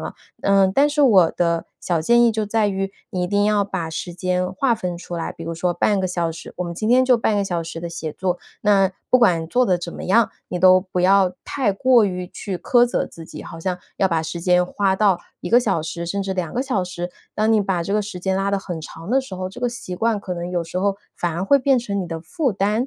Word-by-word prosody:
了。 - - -6 0.3
嗯， 195 -1 +3
但 280 +8 +4
是 295 0 +1
我 195 -11 +6
的 170 -1 0
小 170 -3 0
建 235 +9 +4
议 235 - +5
就 215 -1 -2
在 215 0 +1
于 195 0 -2 0.2
你 180 - -2
一 - - 0
定 205 +2 +1
要 210 -1 +3
把 185 -5 -4
时 170 +2 -5
间 180 0 -1
划 235 +5 +1
分 180 -5 -4
出 175 0 -8
来， 165 - -3
比 - - -11
如 165 0 -4
说 175 +2 0
半 200 +4 +2
个 185 - 0
小 175 -2 -1
时 160 - -10
我 180 - -2
们 170 0 -5
今 215 +5 -2
天 255 +2 +5
就 255 -1 +5
半 220 -2 +1
个 200 - +1
小 175 -3 -2
时 165 0 -7
的 170 - -4
写 165 -2 -5
作， 180 +1 -2 0.2
那 195 -2 +3 0.2
不 255 - +6
管 175 -9 +3
做 250 +7 +2
得 185 - +3
怎 175 0 -7
么 - - -7
样， 225 +4 +3 0.2
你 180 - -3
都 185 0 +7
不 185 -1 -3
要 185 0 +4
太 255 -8 0
过 245 +2 +4
于 180 -2 -3
去 195 0 -5
苛 240 +7 +3
责 240 - -1
自 165 - -11
己， - - -9
好 165 - -9
像 180 +2 -2 0.2
要 195 - +3
把 165 -3 0
时 160 +2 -5
间 180 +1 +3
花 195 +1 0
到 195 -2 +3 0.2
1 175 - -5
个 240 - +7
小 195 -9 0
时 170 +2 -5
甚 200 +4 -2
至 195 0 -2
2 180 -4 -3
个 250 - 0
小 200 -8 -1
时， 175 0 -5 0.2
当 215 +1 +2
你 220 - +4
把 190 -3 -1
这 195 - -3
个 210 - +2
时 200 -3 -6
间 190 +1 0
拉 195 +1 0
得 200 - +1
很 175 -4 -6
长 165 +3 -9
的 265 +2 +4
时 260 -8 -8
候， 185 0 -4
这 200 +6 -11
个 245 - +1
习 235 -7 -7
惯 225 +2 +1
可 185 - -5
能 175 0 -5
有 175 -1 -1
时 170 +2 -5
候 195 +1 0 0.2
反 175 -2 -2
而 175 +3 -2
会 280 +7 +5
变 270 0 +3
成 200 -4 -3
你 185 - -4
的 165 -1 -5
负 290 - -1
担。 210 +5 0
190 Hz, 290 characters per minute, -21 LUFS, 175-215 Hz, 0.3 s, 都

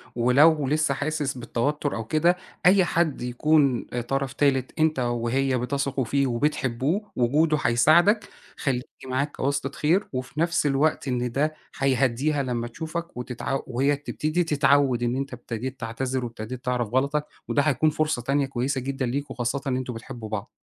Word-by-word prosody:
ولو 140 +5 +4
لسه 150 0 +2
حاسس 145 -1 -2
بالتوتر 140 +5 -1
أو 115 - -4
كده، 165 +8 +2 0.3
أي 185 0 +6
حد 170 -4 0
يكُون 135 +1 +2
طرف 130 +2 -3
تالت، 135 -1 0
أنت 155 -3 +2
وهي 125 +2 0
بتثقوا 135 +1 -1
فيه 140 +3 +1
وبتحبوه 140 - -1
وجوده 150 +6 +2
هيساعدك، 170 - +4 0.3
خلّيه 130 -3 0 0.2
معاك 130 +3 -2
كواسطة 140 0 -1
خير. 155 +7 +1
وفي 130 +3 -4
نَفْس 170 -1 +1
الوقت 145 0 +1
إن 125 -1 -1
ده 150 +5 0 0.2
هيهدّيها 135 +2 +1
لمّا 120 -2 -2
تشوفك 160 +5 -6
وتتعو 125 +2 -3
وهي 135 +4 +1
تبتدي 155 +4 -1
تتعود 140 -5 +3
إن 120 +1 0
أنت 135 0 -3
ابتديت 125 +2 -6
تعتذر 125 +3 -2
وابتديت 115 +2 -7
تعرَف 125 -2 0
غلطك، 140 +6 0 0.2
وده 145 - +2
هيكُون 155 +1 +2
فرصة 155 -4 0
تانية 140 +3 +1
كويسة 130 +1 -2
جدًا 135 0 -2
ليكم 140 +4 -3
خاصةً 125 +2 -2
إن 130 -1 +1
أنتم 130 -1 -4
بتحبوا 115 -1 -8
بعض. 110 +2 -4
135 Hz, 155 wpm, -25 LUFS, 125-150 Hz, 0.3 s, أي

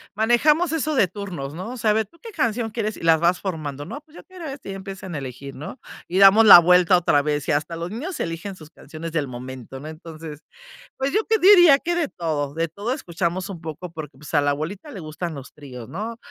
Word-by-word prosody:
manejamos 295 - +3
eso 310 -1 -1
de 250 -9 +3
turnos, 175 -7 -6
¿no?, 185 +7 -6
o 255 - -7
sea, 220 -2 +1
a - - +5
ver: 220 0 +1
"¿Tú 335 +12 -26
qué 460 - -9
canción 230 - -1
quieres?", 215 -1 -3
y - - -12
las 165 -1 +4
vas 175 +2 +2
formando, 155 -7 -4
¿no? 280 - -7
Pues: 310 +1 -23
"Yo - - -11
quiero 370 -3 -11
esta" 275 -6 -7
Y - - -4
ya - - -6
empiezan 190 -2 -8
a - - -2
elegir, 135 0 -7
¿no?, 150 - -8 0.3
y 185 +2 0
damos 200 +3 +8
la 195 -4 +12
vuelta 180 +1 +5
otra 145 -5 +2
vez 150 -1 -2
y - - +1
hasta 150 +3 -1
los 170 +1 -4
niños 280 - -5
eligen 170 +4 -4
sus 155 -4 -14
canciones 165 0 -9
del 155 -4 -1
momento, 130 +1 -8
¿no? 150 - -9
Entonces, 155 -1 -9 0.6
pues 270 +1 -1
yo 430 +2 +2
te 445 - +2
diría 355 -7 +8
que 345 +5 -2
de 345 -3 0
todo, 155 - -3
de 165 +1 0
todo 205 +8 -4
escuchamos 185 - -3
un 180 -4 -8
poco, 165 +2 -7
porque 155 -5 -9
pues 150 +3 -12
a 145 - +4
la 145 - +1
abuelita 160 - -4
le 215 - -8
gustan 160 +1 -5
los 140 -2 -10
tríos, 125 -5 -10
¿no?, 220 - -5
180 Hz, 245 wpm, -23 LUFS, 155-225 Hz, 0.6 s, la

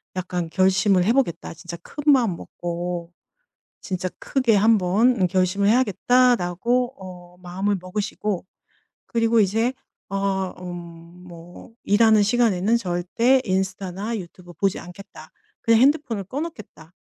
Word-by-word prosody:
약간 180 -2 -3
결심을 190 +1 +3
해 225 - +3
보겠다. 260 -11 -1
진짜 170 +1 -9
큰 295 0 0
마음 230 -10 +1
먹고 175 0 -5 0.7
진짜 185 -1 -3
크게 255 -5 +1
한번 210 +1 +3
결심을 185 +2 +1
해야겠다.'라고 245 0 +2
어 180 -2 -12
마음을 190 +3 -2
먹으시고 200 0 -3 0.6
그리고 230 0 +2
이제 225 +5 +1 0.4
어 195 -1 -1
음 170 -1 -9
뭐 175 +4 -13
'일하는 215 +1 +4
시간에는 220 -1 +2
절대 230 +7 +1
인스타나 190 +3 -2
유튜브 175 -1 -11
보지 195 +3 -1
않겠다. 195 +3 -12 0.3
그냥 230 0 +4
핸드폰을 270 -7 +2
꺼 260 +9 -5
놓겠다.' 215 - -9
195 Hz, 275 characters per minute, -23 LUFS, 180-230 Hz, 0.7 s, 일하는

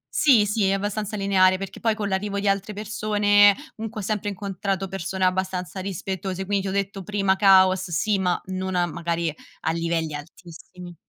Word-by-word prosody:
Sì, 245 -8 +5
sì, 205 -1 +1
abbastanza 205 +1 -2
lineare 185 -1 +3
perché 195 0 -7
poi, 225 -2 +1
con 210 -2 -3
l'arrivo 200 +1 -2
di 200 - -2
altre 200 +1 0
persone, 205 -1 +3 0.2
comunque 220 -1 -6
ho - - -7
sempre 210 0 -2
incontrato 195 0 -3
persone 190 0 -2
abbastanza 185 -1 -2
rispettose, 190 0 -4
quindi 200 0 0
ti - - -1
ho - - -3
detto 200 0 -2
prima 195 0 0
caos, 190 -2 +5
sì, 195 +4 0
ma 180 -2 +1
non 185 0 -3
a 175 0 +2
magari 170 -1 -2 0.3
a 160 - 0
livelli 165 -2 -1
altissimi. 175 +3 -11
195 Hz, 175 wpm, -24 LUFS, 185-205 Hz, 0.3 s, Sì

